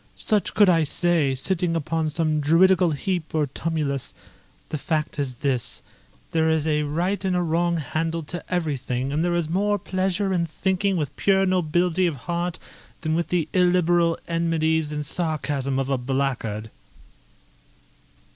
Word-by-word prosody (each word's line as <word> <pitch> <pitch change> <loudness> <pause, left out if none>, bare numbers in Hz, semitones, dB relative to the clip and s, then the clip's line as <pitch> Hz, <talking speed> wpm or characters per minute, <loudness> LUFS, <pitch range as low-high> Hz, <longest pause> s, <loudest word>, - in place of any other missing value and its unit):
Such 210 -2 0
could 205 - +6
I 165 -3 +4
say, 155 -3 +1
sitting 175 +4 0
upon 160 0 -1
some 155 0 0
druidical 175 +4 +4
heap 160 +2 -2
or 155 -1 +2
tumulus. 145 -1 -3 0.5
The 155 - -3
fact 155 -2 -2
is 135 -3 -2
this, 130 -4 -1 0.5
there 160 -1 +2
is 160 -1 +1
a 150 -1 +1
right 175 +7 -1
and 180 -3 0
wrong 170 +1 +2
handle 160 +2 -2
to 175 +4 -6
everything, 135 -6 -1
and 155 +3 +1
there 175 0 +1
is 170 -2 0
more 205 +5 +1
pleasure 190 +1 -1
in 170 -2 0
thinking 190 +3 0
with 150 -5 -3
pure 195 -1 +3
nobility 180 0 +2
of 165 - -2
heart 175 0 -2 0.4
than 155 -1 -1
with 170 +1 0
the 170 -4 0
illiberal 175 -2 +3
enmities 160 -2 0
and 150 0 -3
sarcasm 145 -4 -1
of 135 -1 0
a 135 -2 0
blackguard." 125 -5 -2
165 Hz, 150 wpm, -24 LUFS, 150-180 Hz, 0.5 s, could